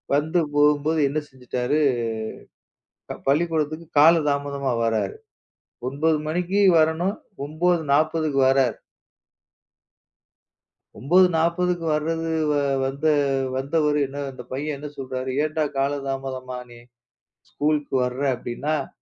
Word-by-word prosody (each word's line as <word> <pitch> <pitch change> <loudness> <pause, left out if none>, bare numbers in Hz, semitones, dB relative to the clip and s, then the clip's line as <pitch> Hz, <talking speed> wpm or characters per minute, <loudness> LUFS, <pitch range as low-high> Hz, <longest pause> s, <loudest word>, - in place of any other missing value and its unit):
வந்து 160 +4 +1 0.2
போகும்போது 150 +2 +3
என்ன 150 +3 -1
செய்துட்டார்? 125 +2 -2 1.5
பள்ளிக்கூடத்துக்கு 155 +1 0
காலம் 160 0 +6
தாமதமாக 140 -3 -1
வருகிறார். 115 - 0 0.7
9 155 +4 +1
மணிக்கு 180 +5 0 0.2
வர 155 - +6
வேண்டும். 180 +5 -2 0.3
9:40க்கு 155 -2 +1
வருகிறார். 130 -3 +2 2.2
9:40க்கு 175 +2 +2
வர்றது 165 +1 -2 0.5
வந்த 140 +3 -4 0.5
வந்தவரு 150 +2 +1
இன்ன 140 +1 -5
அந்தப் 125 -1 -12
பையன் 145 +3 -3
என்ன 150 +2 -7
சொல்கிறார்? 130 -1 -4
ஏன்டா 155 0 -1
காலம் 140 0 -1
தாமதமாக 130 -2 -5
நீ 120 - -13 0.7
ஸ்கூலுக்கு 150 -2 -1
வருகிறாய் 130 +1 0
அப்படி 120 0 -6
என்றால், 150 -1 -1
150 Hz, 100 wpm, -23 LUFS, 135-160 Hz, 2.2 s, காலம்